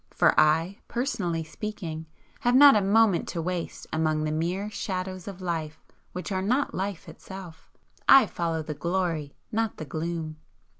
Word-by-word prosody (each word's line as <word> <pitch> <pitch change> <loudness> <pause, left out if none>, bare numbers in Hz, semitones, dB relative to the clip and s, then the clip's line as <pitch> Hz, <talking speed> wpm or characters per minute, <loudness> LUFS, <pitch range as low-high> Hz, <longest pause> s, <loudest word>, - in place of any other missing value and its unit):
For - - +3
I, 160 +5 +3
personally 215 -10 -1
speaking, 165 -2 -6 0.3
have 245 +1 +2
not 280 -1 +9
a 210 - +4
moment 200 -1 +3
to 170 - -3
waste 175 -1 -4
among 155 -1 +1
the 155 - -1
mere 175 +6 -1
shadows 185 -3 -4
of 195 -2 -7
life 160 -3 -4 0.3
which 180 +2 -6
are 190 -1 0
not 250 +9 +1
Life 195 -2 -3
itself. 170 0 -10 0.4
I 270 -3 +9
follow 165 -4 -2
the 150 - -4
glory, 165 -2 -2 0.2
not 225 -1 -1
the 155 - -6
gloom. 160 +1 -4
175 Hz, 155 wpm, -27 LUFS, 160-200 Hz, 0.4 s, not